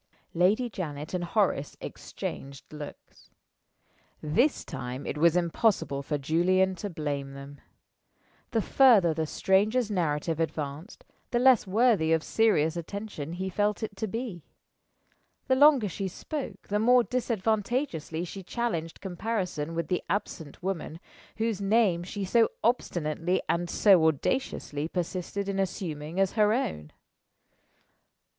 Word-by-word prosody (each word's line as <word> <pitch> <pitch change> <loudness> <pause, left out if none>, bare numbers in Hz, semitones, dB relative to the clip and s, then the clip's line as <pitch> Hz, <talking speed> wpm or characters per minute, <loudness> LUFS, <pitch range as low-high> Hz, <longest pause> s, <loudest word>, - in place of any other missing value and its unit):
Lady 200 +8 +3
Janet 155 -8 -6
and 180 -1 -1
Horace 175 -6 0
exchanged 135 +2 -7
looks. 150 -1 -11 0.9
This 235 - +1
time 130 -2 -6
it - - -3
was 165 +2 +4
impossible 170 - +1
for 145 +2 -2
Julian 180 +6 +2
to 205 - -4
blame 145 -5 -4
them. 140 +1 -10 0.9
The 225 -3 0
further 220 -11 +5
the 160 0 -2
stranger's 210 +7 +2
narrative 160 -3 -1
advanced, 155 - -4 0.2
the 240 - 0
less 250 -4 +5
worthy 210 -5 +3
of 160 -1 +1
serious 175 -8 +2
attention 170 -3 -6
he 190 +2 -3
felt 205 +4 0
it 215 - -4
to 220 - -2
be. 215 - -5 1.0
The 260 - +3
longer 280 -5 +6
she 195 +2 -3
spoke, 220 - -6
the 205 +1 +1
more 245 +2 +5
disadvantageously 220 - -1
she 195 +3 -8
challenged 180 -5 -3
comparison 180 -5 -3
with 165 -2 -2
the 180 - 0
absent 170 -6 -4
woman, 175 -4 -3 0.4
whose 220 -3 -1
name 200 -4 +3
she 195 +3 -4
so 225 +4 +4
obstinately 175 - 0
and 170 +1 0
so 190 -4 +5
audaciously 155 - -1
persisted 185 +3 -3
in 195 -1 -2
assuming 170 -4 -3
as 195 -1 +3
her 215 -1 +3
own. 75 - -2
185 Hz, 130 wpm, -28 LUFS, 160-220 Hz, 1.0 s, longer